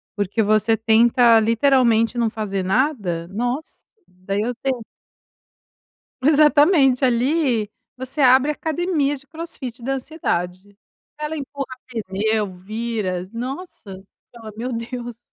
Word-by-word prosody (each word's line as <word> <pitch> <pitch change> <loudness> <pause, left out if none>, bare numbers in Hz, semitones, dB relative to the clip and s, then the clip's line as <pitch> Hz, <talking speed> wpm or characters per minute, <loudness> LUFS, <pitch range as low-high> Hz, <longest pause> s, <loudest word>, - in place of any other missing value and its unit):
Porque 205 +2 -1
você 215 +1 +3
tenta 230 +1 +5
literalmente 230 0 +3
não 235 -2 +1
fazer 200 -4 -3
nada, 195 - 0
nossa! 245 - -4 0.2
Daí, 185 +3 -4
eu 240 +3 -1
tenho 255 -1 -3 1.4
Exatamente 290 -2 +5
ali, 250 -2 +1 0.3
você 260 +3 -4
abre 260 +2 +5
a - - +1
academia 315 -2 -1
de 275 0 -14
crossfit 265 -7 -8
da 270 +3 -1
ansiedade. 200 - -4 0.4
Ela 300 +1 -3
empurra 275 -2 -6
pneu, 215 -2 -2
vira, 205 -2 -3
nossa! 255 - -7
Você 190 - -14 0.3
fala: 225 -2 -10
"Meu 245 +3 -4
Deus!". 235 0 -6
235 Hz, 115 wpm, -21 LUFS, 215-275 Hz, 1.4 s, tenta